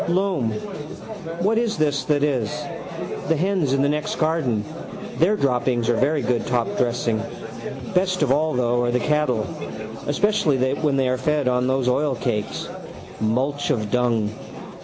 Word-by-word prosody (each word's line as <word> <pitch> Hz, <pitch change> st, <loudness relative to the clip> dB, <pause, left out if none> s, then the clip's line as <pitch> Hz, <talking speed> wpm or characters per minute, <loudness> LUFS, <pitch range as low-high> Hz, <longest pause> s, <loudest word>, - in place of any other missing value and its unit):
Loam, 180 Hz, -, +1 dB, 0.9 s
what 220 Hz, +3 st, +3 dB
is 230 Hz, -2 st, 0 dB
this 145 Hz, -2 st, +1 dB
that 145 Hz, -1 st, +2 dB
is? 130 Hz, -7 st, +1 dB, 0.8 s
The 165 Hz, -, +3 dB
hens 180 Hz, -3 st, +1 dB
in 135 Hz, 0 st, +3 dB
the -, -, +4 dB
next 150 Hz, +1 st, -1 dB
garden: 155 Hz, -10 st, +1 dB, 0.5 s
their 180 Hz, +7 st, +4 dB
droppings 125 Hz, -, +1 dB
are 120 Hz, -, +4 dB
very 140 Hz, +3 st, +2 dB
good 120 Hz, -1 st, 0 dB
top 120 Hz, -1 st, +1 dB
dressing. 120 Hz, -2 st, +1 dB, 0.7 s
Best 185 Hz, -2 st, +2 dB
of 135 Hz, -, +2 dB
all 155 Hz, +1 st, +2 dB
though 120 Hz, -1 st, +2 dB
are 120 Hz, -, +1 dB
the 125 Hz, +1 st, +2 dB
cattle, 130 Hz, -6 st, +1 dB, 0.6 s
especially 160 Hz, -2 st, +2 dB, 0.2 s
when 145 Hz, -1 st, +1 dB
they 135 Hz, -1 st, +2 dB
are 130 Hz, 0 st, 0 dB
fed 150 Hz, -4 st, +1 dB
on 125 Hz, 0 st, +2 dB
those 130 Hz, -1 st, +1 dB
oilcakes. 125 Hz, -5 st, 0 dB, 0.5 s
Mulch 130 Hz, +7 st, 0 dB
of 110 Hz, -8 st, 0 dB
dung. 115 Hz, -3 st, +2 dB
135 Hz, 150 wpm, -23 LUFS, 120-155 Hz, 0.9 s, the